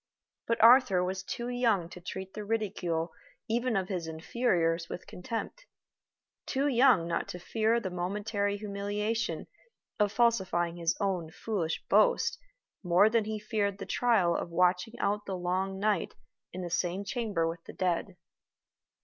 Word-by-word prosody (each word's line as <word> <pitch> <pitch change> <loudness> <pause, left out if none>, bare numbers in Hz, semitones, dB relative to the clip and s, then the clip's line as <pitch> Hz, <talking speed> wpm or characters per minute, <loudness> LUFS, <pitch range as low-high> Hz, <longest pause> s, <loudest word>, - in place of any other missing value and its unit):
But 230 0 +1
Arthur 235 -6 +7
was 190 +1 -2
too 235 +5 -5
young 235 -8 +1
to 180 - -11
treat 190 +1 -6
the 210 - -5
ridicule 185 -6 -1 0.4
even 235 +1 0
of 190 -2 0
his 180 -4 -3
inferiors 165 -1 0
with - - -6
contempt 230 - -6 0.8
too 275 +2 +1
young 245 -9 +4
not 170 - -1
to 180 - -6
fear 225 +5 +1
the 190 -5 -4
momentary 200 +3 -1
humiliation 210 +2 -2 0.5
of 205 -1 +3
falsifying 185 -8 +1
his 170 -1 0
own 185 -6 -1
foolish 170 -2 -3
boast - - +3 0.4
more 185 +3 +4
than 230 -2 +2
he 215 0 -3
feared 205 -2 -1
the - - -6
trial 210 -9 +2
of - - -3
watching 180 +6 +1
out 205 +1 -1
the 190 -1 -2
long 185 +2 -1
night 205 -2 0 0.4
in 185 0 -5
the 175 - -5
same 180 +2 -1
chamber 205 -8 -1
with 165 +1 -5
the - - -9
dead. 180 +1 -1
200 Hz, 150 wpm, -30 LUFS, 180-225 Hz, 0.8 s, Arthur